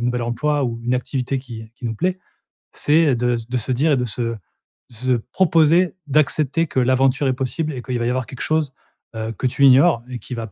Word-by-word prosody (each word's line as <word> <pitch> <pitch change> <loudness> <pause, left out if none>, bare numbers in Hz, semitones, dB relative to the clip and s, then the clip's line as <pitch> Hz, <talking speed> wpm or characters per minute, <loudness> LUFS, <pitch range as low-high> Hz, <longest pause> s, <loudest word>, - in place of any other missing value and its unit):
nouvel 120 0 -1
emploi 145 +5 0
ou 115 -2 -3
une 125 +1 0
activité 130 +1 -2
qui 115 -4 -9
qui 125 - -12
nous 110 - -3
plaît, 185 - -1 0.5
c'est, 155 +2 +2
heu, 130 - +3
de 120 +1 0
s 115 0 -6
de 125 - -1
se 120 +3 -3
dire 145 +6 +2
et 135 - +2
de 125 - -1
se 115 0 -3 0.6
de 115 - -13
se 130 +2 -1 0.2
proposer, 170 0 +3
d'accepter 155 +2 +1
que - - -8
l'aventure 130 +2 +2
est 130 - +3
possible 135 +5 -3
et 125 - -5
qu'il 125 -1 -3
va 120 - -1
y 120 - +1
avoir 130 0 -1
quelque 130 - -9
chose, 155 -4 0 0.4
heu, 110 0 -3
que 130 - -1
tu 140 +3 +2
ignores 135 -1 +5
et 125 -2 -6
qui 125 - -9
va 115 -2 -6
130 Hz, 235 wpm, -21 LUFS, 120-150 Hz, 0.6 s, ignores